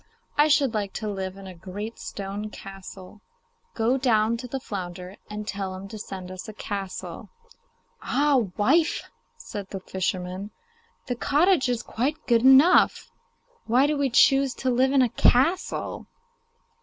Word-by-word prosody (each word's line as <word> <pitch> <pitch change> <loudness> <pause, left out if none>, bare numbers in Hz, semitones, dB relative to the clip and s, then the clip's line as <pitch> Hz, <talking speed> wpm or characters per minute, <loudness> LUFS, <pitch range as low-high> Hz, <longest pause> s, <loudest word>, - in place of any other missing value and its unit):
I 295 +1 +5
should 280 -5 +3
like 205 -3 -2
to 215 - -4
live 190 -2 -4
in 195 - -10
a 190 - -8
great 195 +6 -7
stone 200 +2 -5
castle. 195 0 -11 0.5
Go 235 +3 +2
down 225 -3 +2
to 250 +2 -7
the 265 +2 -4
flounder, 180 -4 -6
and 210 0 -6
tell 195 -2 -4
him 190 +1 -8
to 215 0 -8
send 185 -2 -7
us 185 +4 -8
a - - -8
castle.' 200 -2 -6 0.7
'Ah, 280 -4 +2
wife!' 305 +10 +2 0.3
said 205 -2 -7
the 195 - -5
fisherman, 185 +1 -3 0.6
'the 245 -2 -3
cottage 300 +1 +3
is 240 -2 -1
quite 275 +7 -2
good 235 -2 +3
enough; 265 +7 +5 0.6
why 250 +4 +4
do 300 +1 +1
we 280 -1 +1
choose 270 +1 +4
to 260 - -1
live 260 +2 +3
in 275 -2 +4
a 245 - +1
castle? 270 - +1
220 Hz, 155 wpm, -25 LUFS, 195-265 Hz, 0.7 s, I